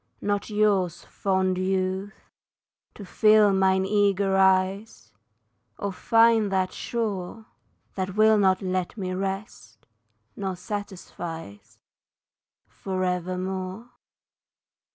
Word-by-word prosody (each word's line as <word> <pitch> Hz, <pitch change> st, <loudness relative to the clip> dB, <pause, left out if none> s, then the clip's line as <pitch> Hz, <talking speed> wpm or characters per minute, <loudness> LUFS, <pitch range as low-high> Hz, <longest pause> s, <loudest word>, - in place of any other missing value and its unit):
Not 205 Hz, +1 st, -2 dB
yours, 200 Hz, -5 st, +1 dB
fond 190 Hz, -1 st, -1 dB
youth, 190 Hz, +2 st, -3 dB, 0.6 s
to 205 Hz, -, -9 dB
fill 215 Hz, +1 st, +4 dB
mine 190 Hz, 0 st, +2 dB
eager 200 Hz, -1 st, +2 dB
eyes 190 Hz, +2 st, +1 dB, 0.6 s
Or 200 Hz, -1 st, -3 dB
find 225 Hz, 0 st, +3 dB
that 190 Hz, -1 st, 0 dB
shore 220 Hz, -2 st, -4 dB, 0.5 s
That 190 Hz, 0 st, -4 dB
will 215 Hz, 0 st, +5 dB
not 190 Hz, -1 st, +2 dB
let 185 Hz, +2 st, -2 dB
me 185 Hz, -2 st, -3 dB
rest, 195 Hz, +3 st, -6 dB, 0.5 s
nor 190 Hz, -2 st, -3 dB
satisfies 170 Hz, -, -7 dB, 0.9 s
For 185 Hz, -1 st, -4 dB
evermore. 185 Hz, +4 st, -3 dB
190 Hz, 90 wpm, -25 LUFS, 185-205 Hz, 0.9 s, will